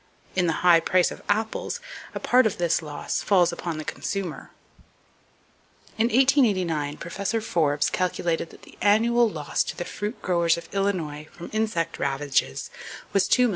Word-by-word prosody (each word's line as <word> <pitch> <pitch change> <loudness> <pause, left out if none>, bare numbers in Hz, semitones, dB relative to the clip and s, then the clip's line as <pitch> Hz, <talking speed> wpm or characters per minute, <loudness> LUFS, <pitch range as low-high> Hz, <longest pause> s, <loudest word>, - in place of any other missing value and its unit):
In 180 -2 +2
the 165 +2 -1
high 170 -2 +8
price 180 +1 +2
of - - -9
apples, 220 +2 -1 0.4
a - - -2
part 250 -1 +4
of 210 - -4
this 170 -1 +1
loss 150 -2 -3
falls 180 -4 +3
upon 170 -2 -4
the 155 - -6
consumer. 195 -5 -4 1.5
In 220 - +2
1889 200 - +2
Professor 200 +6 -2
Forbes 155 -8 +1
calculated 175 -2 -1
that - - -16
the - - -16
annual 230 +3 +4
loss 155 -6 -1
to - - -6
the 175 - -3
fruit 210 +4 -5
growers 170 -2 +2
of 170 - -10
Illinois 170 -7 -1
from 170 - -9
insect 215 -7 -1
ravages 135 - -1 0.4
was 195 -2 +2
$2,375,000. 250 -1 +4
180 Hz, 155 wpm, -25 LUFS, 165-210 Hz, 1.5 s, high